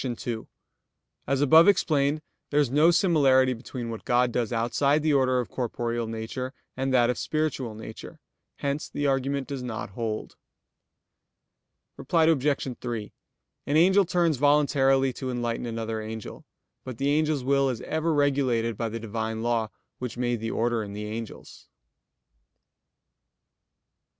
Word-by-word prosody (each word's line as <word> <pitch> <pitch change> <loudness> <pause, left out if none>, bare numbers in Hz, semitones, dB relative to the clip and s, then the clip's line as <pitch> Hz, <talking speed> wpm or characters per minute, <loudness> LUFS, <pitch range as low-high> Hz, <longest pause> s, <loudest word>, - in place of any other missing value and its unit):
2: 115 -2 -5 0.8
As 140 0 +1
above 160 +5 +7
explained, 155 -6 +2 0.3
there 145 - +2
is 140 -5 +2
no 150 +4 +5
similarity 140 -8 +4
between 120 0 -6
what 115 - -7
God 120 0 +2
does 120 -1 -1
outside 140 +6 +1
the 155 -1 +2
order 130 -2 +3
of 125 - -2
corporeal 120 -1 -3
nature, 115 +4 -5 0.2
and 135 +1 -1
that 125 -2 +4
of - - -5
spiritual 150 -7 -2
nature. 110 0 -10 0.4
Hence 140 +1 -3
the 145 - -3
argument 135 0 0
does 140 -2 -5
not 115 -5 -5
hold. 110 +1 -4 1.6
Reply 165 +3 +2
Obj. 140 -4 +1
3: 115 -4 -5 0.5
An 145 - +2
angel 190 +4 +5
turns 170 -4 +1
voluntarily 135 -2 +3
to 130 +1 -5
enlighten 120 -1 -2
another 115 -1 -3
angel, 110 0 -8 0.4
but 130 -3 -7
the 140 +2 +1
angel's 155 -3 +1
will 140 +1 +2
is 120 -3 -3
ever 160 +1 -1
regulated 135 -6 +1
by 115 +2 -2
the 115 +1 -5
Divine 110 0 -4
law 115 -2 0 0.3
which 125 -2 -5
made 120 -1 -1
the 115 +1 -3
order 115 0 0
in 100 -2 -6
the 105 +1 -5
angels. 110 +1 -8
130 Hz, 145 wpm, -26 LUFS, 115-145 Hz, 1.6 s, above